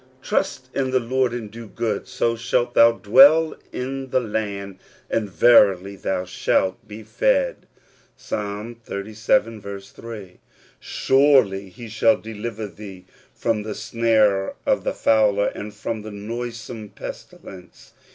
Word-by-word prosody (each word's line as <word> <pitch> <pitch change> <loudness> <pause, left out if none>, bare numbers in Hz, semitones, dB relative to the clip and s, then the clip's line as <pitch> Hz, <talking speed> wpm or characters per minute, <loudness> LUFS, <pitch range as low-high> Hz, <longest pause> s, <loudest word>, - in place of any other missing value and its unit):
"Trust 130 0 -2
in 130 -1 -1
the 130 - +2
l^oxC^^' 130 +1 0
and 115 -4 -6
do 115 +1 -9
good; 105 -1 -3
so 115 0 0
shalt 120 +1 0
thou 115 -1 +6
dwell 140 +9 +6 0.2
in 135 +1 -5
the 130 - +2
land, 100 -4 -4 0.3
an^^ 105 -3 0
verily 100 -3 +4
thou 95 -1 -2
shalt 95 +1 -1
be 110 +1 -9
fed" - - 0 0.5
(Ps. - - -11
xxxvii. 105 +3 -4
3). 100 0 -6 1.7
"Surel)* 135 -4 +4
^ 95 0 -7
he 120 +5 -10
shall 110 +1 +3
deliver 110 0 -6
thee 95 -1 -11 0.3
from 115 -2 -1
the 105 0 -5
snare 110 -4 +1
of - - +1
the - - -1
fowler^^ 105 -2 +2
and 105 +1 -7
from 110 +1 -5
the 110 - -8
noisome 115 +1 -6
pestilence. 90 -2 -11
110 Hz, 130 wpm, -22 LUFS, 100-120 Hz, 1.7 s, thou